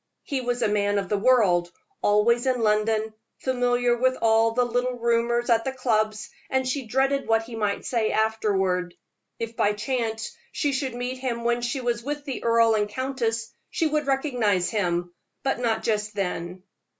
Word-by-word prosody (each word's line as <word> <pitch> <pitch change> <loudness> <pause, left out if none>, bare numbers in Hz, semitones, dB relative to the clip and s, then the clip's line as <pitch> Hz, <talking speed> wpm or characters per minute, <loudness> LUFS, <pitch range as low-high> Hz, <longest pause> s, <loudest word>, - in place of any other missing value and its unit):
He 275 -2 -2
was 245 -1 -1
a - - +3
man 205 -1 +1
of 195 -2 -2
the 205 - +1
world, 195 -8 +3 0.3
always 235 +4 +3
in 255 -1 +2
London, 215 +1 +1 0.2
familiar 245 -1 +1
with 255 +2 +1
all 225 0 +4
the 245 +2 +1
little 245 +1 -1
rumors 235 0 +1
at 230 -1 +3
the 265 - -2
clubs, 215 -4 -1 0.2
and 260 -1 0
she 260 -2 -2
dreaded 270 +3 +1
what 225 0 +3
he 230 0 -9
might 210 -2 -1
say 230 -3 0
afterward. 195 -5 0 0.4
If 230 0 -5
by 205 -1 +2
chance 225 0 -3 0.2
she 290 -2 0
should 265 -2 -2
meet 250 +1 -4
him 240 -3 -3
when 240 0 +1
she 240 +3 -2
was 240 -2 -1
with 290 +2 -4
the 270 -3 -5
earl 230 -1 +4
and 210 -1 +1
countess, 230 -2 -2 0.2
she 330 - -1
would 300 -1 0
recognize 245 - +1
him, 175 -4 -1 0.3
but 270 -2 0
not 225 -2 0
just 210 -1 -1
then. 180 -2 -3
230 Hz, 175 wpm, -25 LUFS, 215-255 Hz, 0.4 s, all